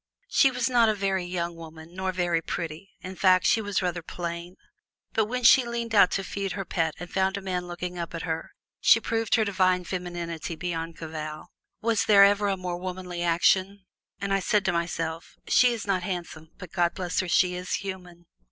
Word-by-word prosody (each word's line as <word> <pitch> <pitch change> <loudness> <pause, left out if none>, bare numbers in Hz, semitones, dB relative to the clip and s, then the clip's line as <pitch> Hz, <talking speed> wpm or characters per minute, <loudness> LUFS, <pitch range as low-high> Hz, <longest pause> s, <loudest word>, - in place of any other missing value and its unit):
She 270 - +5
was 250 -2 -1
not 240 -3 +4
a 215 - +1
very 195 -2 0
young 175 -1 -3
woman, 160 0 -11
nor 190 0 -2
very 175 -2 0
pretty 165 +3 -5
in 185 +1 -7
fact, 185 -1 +4
she 225 - +4
was 205 -3 -1
rather 175 -1 -1
plain 170 +1 -6 0.6
but 220 - +2
when 250 +3 -3
she 255 +3 +7
leaned 235 -1 -4
out 200 -3 +6
to 195 - -1
feed 195 0 -4
her 195 -1 -4
pet 165 -2 -1
and 175 - -6
found 190 +1 +1
a - - -3
man 180 -2 -3
looking 175 0 -5
up 170 0 -5
at 165 - -5
her 165 -1 -3 0.3
she 230 - +6
proved 225 -1 0
her 220 -2 +2
divine 185 -2 +2
femininity 175 -2 -5
beyond 165 -1 -4
cavil. 155 -1 -7 0.3
Was 230 -2 +2
there 200 -2 +7
ever 205 +1 +4
a 195 -1 0
more 180 -1 -4
womanly 180 -1 -5
action? 185 +3 +2 0.3
And 200 0 -1
I 195 - +3
said 205 +1 +1
to 175 - +1
myself, 165 -1 -3
"She 250 -1 +5
is 230 -3 -4
not 195 -2 0
handsome 170 -4 -5
but 185 -2 -10
God 175 -2 +1
bless 180 -2 -2
her, 185 - -1
she 180 +2 +3
is 180 0 -6
human!" 180 -3 -7
180 Hz, 205 wpm, -26 LUFS, 170-200 Hz, 0.6 s, she